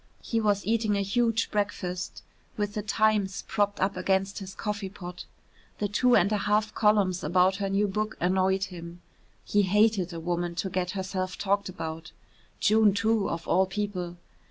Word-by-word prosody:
He 230 -1 0
was 205 -3 +1
eating 215 -1 +1
a 200 - +1
huge 230 +2 +1
breakfast, 185 -3 -3 0.3
with 205 -1 -1
the 210 - -2
"Times" 210 -2 +1
propped 205 -2 0
up 195 +1 +1
against 190 +1 0
his 195 -1 -8
coffee 205 -2 -3
pot. 180 -2 -9 0.5
The 205 - -1
two 245 +5 +3
and 195 +4 +4
a 210 - +1
half 210 +1 +1
columns 205 -4 +2
about 185 +4 +3
her 200 -1 -2
new 200 +2 +2
book 215 +2 -2
annoyed 190 +2 +2
him. 175 -2 -8 0.4
He 205 - +3
hated 205 -1 +2
a 170 - -5
woman 175 +1 -2
to 185 +2 -3
get 180 -1 -1
herself 185 -1 -3
talked 200 0 0
about 160 -2 -6 0.5
June, 215 -2 +4
too, 220 -1 +1
of 165 0 -4
all 190 +1 +3
people. 190 -3 -4
195 Hz, 170 wpm, -27 LUFS, 185-210 Hz, 0.5 s, and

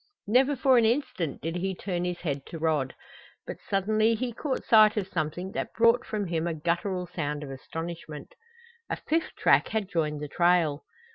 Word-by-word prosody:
Never 260 +7 +3
for 265 -1 +4
an 230 - +3
instant 235 - -1
did 165 +2 -2
he 190 +1 -2
turn 180 -1 -3
his 180 -1 -3
head 140 -5 -3
to 165 - -7
Rod. 155 -5 0 0.5
But - - -6
suddenly 215 +3 +2
he 240 +1 -3
caught 265 +3 -3
sight 215 -1 +6
of 195 -3 -1
something 175 +2 -3
that - - -4
brought 230 +2 +4
from 210 -2 -2
him 170 -1 -1
a 165 - -2
guttural 175 +3 -1
sound 150 -4 -4
of 140 - -7
astonishment. 160 +2 -7 0.6
A - - 0
fifth 325 +1 -2
track - - +4
had 220 -3 -2
joined 155 -5 -1
the 150 - -5
trail! 170 -2 +2
180 Hz, 185 wpm, -27 LUFS, 160-220 Hz, 0.6 s, sight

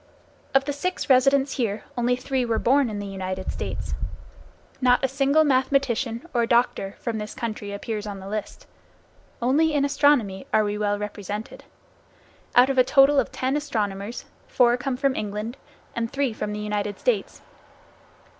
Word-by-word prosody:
Of 270 0 +5
the 285 - -2
six 365 +1 -2
residents 270 +2 +4
here, 220 -5 -1
only 245 0 +1
three 255 +1 -1
were 230 -2 0
born 270 +2 +3
in 210 - -4
the 205 - -4
United 190 -1 -4
States. - - -4 0.9
Not 250 +1 +4
a - - +2
single 275 +3 +3
mathematician, 260 -3 +1
or 235 -2 +2
doctor, 235 -5 +1
from 230 -3 -3
this 210 0 -6
country 215 -3 -4
appears 210 +1 -4
on 200 -1 -6
the 190 - -9
list. 210 +1 -5 0.8
Only 300 +5 +3
in 280 -1 +3
astronomy 275 -9 +2
are 215 - +4
we 205 0 -1
well 205 -1 0
represented. 210 +1 -6 0.9
Out 250 +2 +6
of 265 - +1
a - - +8
total 275 +1 +5
of - - -1
ten 260 +2 -1
astronomers, 220 -7 -3 0.2
four 240 -1 +4
come 250 +1 -3
from 275 0 +1
England, 210 +3 -4 0.4
and 230 -1 -2
three 275 -4 0
from 210 -1 -4
the 210 - -4
United 210 -1 -2
States. - - -1
240 Hz, 165 wpm, -24 LUFS, 210-270 Hz, 0.9 s, a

